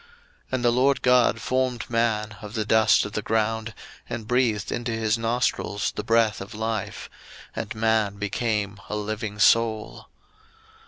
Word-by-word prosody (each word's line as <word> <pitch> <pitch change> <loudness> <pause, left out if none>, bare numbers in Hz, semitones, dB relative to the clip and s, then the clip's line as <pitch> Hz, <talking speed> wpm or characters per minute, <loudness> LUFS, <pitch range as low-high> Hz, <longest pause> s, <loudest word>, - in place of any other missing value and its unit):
01:002:007 470 - -26 0.4
And 125 -2 0
the 120 - +5
LORD 130 +3 +2
God 125 -3 +4
formed 130 -1 -1
man 110 -2 0
of 105 +1 -8
the 110 -1 -1
dust 110 +1 +4
of 105 - -6
the 105 - -2
ground, 110 +1 -1 0.3
and 110 -2 -5
breathed 120 -5 +1
into 120 0 -2
his 110 -1 +1
nostrils 115 -2 -1
the - - -5
breath 115 -2 +2
of 100 +3 -8
life; 110 -1 -3 0.5
and - - -4
man 110 -2 +1
became 105 0 -2
a - - -2
living 105 0 -4
soul. 110 +1 +2
110 Hz, 155 wpm, -25 LUFS, 105-120 Hz, 0.5 s, the